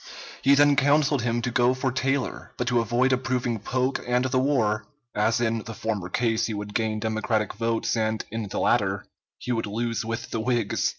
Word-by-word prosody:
He 140 +1 +5
then 145 0 +5
counseled 145 0 +3
him 120 0 -1
to 125 - -1
go 125 +1 +3
for 130 0 -1
Taylor, 135 +1 -2
but 125 - -2
to 120 -1 +3
avoid 120 +3 +2
approving 125 -2 -1
Polk 130 +5 -1
and 125 +1 +2
the 130 0 +1
war, 115 -6 +1 0.3
as 110 +3 +1
in 115 -1 +1
the 115 +1 -8
former 105 -6 -3
case 115 +1 +1
he 110 - -3
would 105 0 -6
gain 110 -1 0
Democratic 110 0 -1
votes 115 +1 -1
and 110 -1 -1
in 110 -1 -3
the - - -3
latter - - +1 0.3
he 125 - -5
would 115 -3 -1
lose 115 +3 -2
with 115 +1 -5
the 115 - -1
Whigs. 115 -2 0
115 Hz, 195 wpm, -25 LUFS, 110-130 Hz, 0.3 s, He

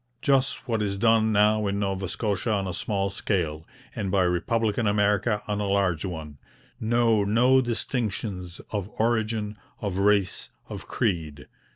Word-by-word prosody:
Just 135 -1 +1
what 115 -3 0
is 100 -1 -1
done 110 +1 +3
now 105 0 +3
in 100 0 -1
Nova 95 -2 -2
Scotia 105 +1 -1
on 100 -2 0
a 90 - -3
small 100 0 -1
scale, 80 -7 -2 0.3
and 100 - -2
by 95 0 +3
republican 105 +5 +1
America 105 +1 +2
on 105 -1 -1
a 100 - -1
large 95 -5 +1
one: 80 -6 -6 0.4
know 115 -1 +2
no 125 +6 +4
distinctions 110 -7 -3
of 105 -2 -3
origin, 110 -2 0 0.2
of 100 -2 -3
race, 100 -1 +2 0.2
of - - -8
creed. 80 -10 -2
105 Hz, 150 wpm, -26 LUFS, 95-110 Hz, 0.4 s, no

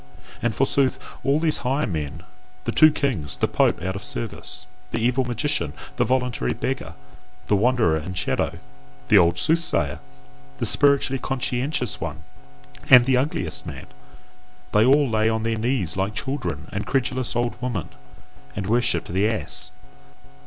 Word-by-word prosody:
And 120 -3 0
forsooth! 135 0 +2 0.3
all 140 +2 +2
these 160 -1 0
higher 135 +4 0
men, 80 -1 -4 0.4
the 115 - -2
two 155 +6 +6
kings, 85 - -2
the - - +1
pope - - +1
out 95 +1 -2
of 100 - -6
service, 90 -5 -4 0.2
the 115 - -3
evil 125 +3 +1
magician, 120 - -1 0.2
the - - +3
voluntary 125 -1 0
beggar, 125 -11 -4 0.5
the 105 - +2
wanderer 110 -6 +2
and 90 +4 -6
shadow, - - -1 0.5
the 105 - +7
old 85 -1 +3
soothsayer, 90 - +1 0.6
the - - -2
spiritually 140 -2 +2
conscientious 130 0 -1
one, - - -5 0.7
and 125 -2 +9
the 130 0 +3
ugliest 110 - +1
man - - -7 0.9
they 105 - +4
all 140 +3 +5
lay 110 -1 +2
on 110 0 -1
their 115 0 0
knees 115 - -1
like 95 +2 -2
children 90 - -3
and 100 - -4
credulous 130 -2 -1
old 120 -1 0
women, 120 - -3 0.7
and 100 - -3
worshipped 120 +4 +1
the 95 +5 +1
ass. 90 -4 +1
115 Hz, 150 wpm, -23 LUFS, 95-130 Hz, 0.9 s, and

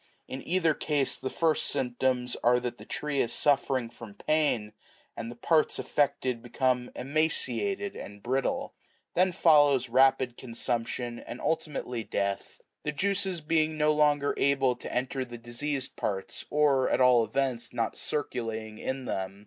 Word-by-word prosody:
In 130 - -6
either 165 -2 +3
case 145 -2 0
the 130 - -4
first 160 +1 +1
symptoms 125 -1 0
are 125 +1 +5
that 120 -1 -5
the - - -11
tree 150 -2 -1
is 115 - 0
suffering 135 -4 +2
from 115 -3 -11
pain, 130 -6 0 0.4
and 115 0 -5
the 120 - -8
parts 155 +6 +2
affected 130 -4 0
be 120 - -12
come 125 -1 +1
emaciated 155 - -1
and 100 0 -9
brittle; 130 +2 -1 0.4
then 185 +1 +3
follows 145 -7 +4
rapid 130 0 +3
consumption 120 0 -3
and 120 - -8
ultimately 145 -7 -2
death; 100 -2 -3 0.2
the 150 - -2
juices 190 +2 -1
being 155 0 +1
no 150 0 +3
longer 145 -1 +3
able 135 -2 +2
to - - -7
enter 130 +2 -1
the 120 -1 -9
diseased 130 +4 -4
parts, 95 -2 -3
or, 145 -3 +3
at - - +1
all 125 -2 +6
events, 130 -1 -1
not 115 -1 -2
circulating 110 -6 -3
in 130 0 -3
them. 95 -2 -4
130 Hz, 150 wpm, -28 LUFS, 120-150 Hz, 0.4 s, all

